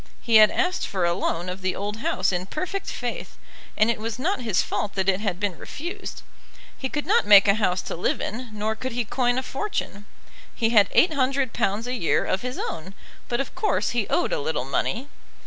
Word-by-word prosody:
He 230 -2 +4
had 215 -1 +8
asked 365 0 0
for 185 -3 -1
a 170 - +2
loan 170 +1 -2
of 185 +1 -5
the 185 0 -1
old 205 +2 -4
house 320 +1 0
in 180 0 -2
perfect 370 - -4
faith, - - -5 0.4
and 220 +2 +4
it 230 - -3
was 225 0 -4
not 325 +5 -1
his 220 -6 +1
fault 205 - -3
that 190 -1 0
it 190 -1 +3
had 200 -4 -2
been 200 -3 -1
refused. 350 +7 -7 0.5
He 265 - -4
could 295 +1 -3
not 460 +4 +3
make 200 -1 +8
a 200 - +6
house 185 -4 0
to - - -5
live 170 - 0
in, 240 +3 -4
nor 215 +1 -2
could 255 +2 -5
he 240 0 -1
coin 245 +2 +1
a 260 - -1
fortune. 260 - -4 0.5
He 225 -1 +1
had 205 -4 +5
£800 260 - +2
a 250 - -3
year 200 -10 +1
of 185 - 0
his 250 +1 -4
own, 185 +5 -5 0.3
but 240 - 0
of 275 - -3
course 425 -5 0
he 235 -4 0
owed - - +1
a - - 0
little 145 -3 -2
money. 225 - -1
225 Hz, 215 wpm, -24 LUFS, 195-260 Hz, 0.5 s, had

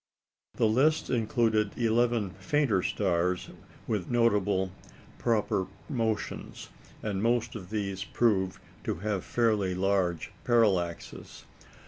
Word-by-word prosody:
The - - +2
list 135 +9 +2
included 110 -3 +1
eleven 115 -3 +2
fainter 145 - +2
stars 90 -2 0 0.3
with 105 -6 -2
notable 105 -5 +2 0.5
proper 105 -5 +1 0.2
motions, 115 -6 -3 0.3
and 100 -3 -2
most 115 +1 +1
of 95 -5 -8
these 100 -3 -2
proved 95 -6 +1 0.2
to - - -1
have 100 0 -2
fairly 105 -6 +1
large 90 -3 0
parallaxes. 100 -8 0
105 Hz, 100 wpm, -29 LUFS, 95-115 Hz, 0.5 s, The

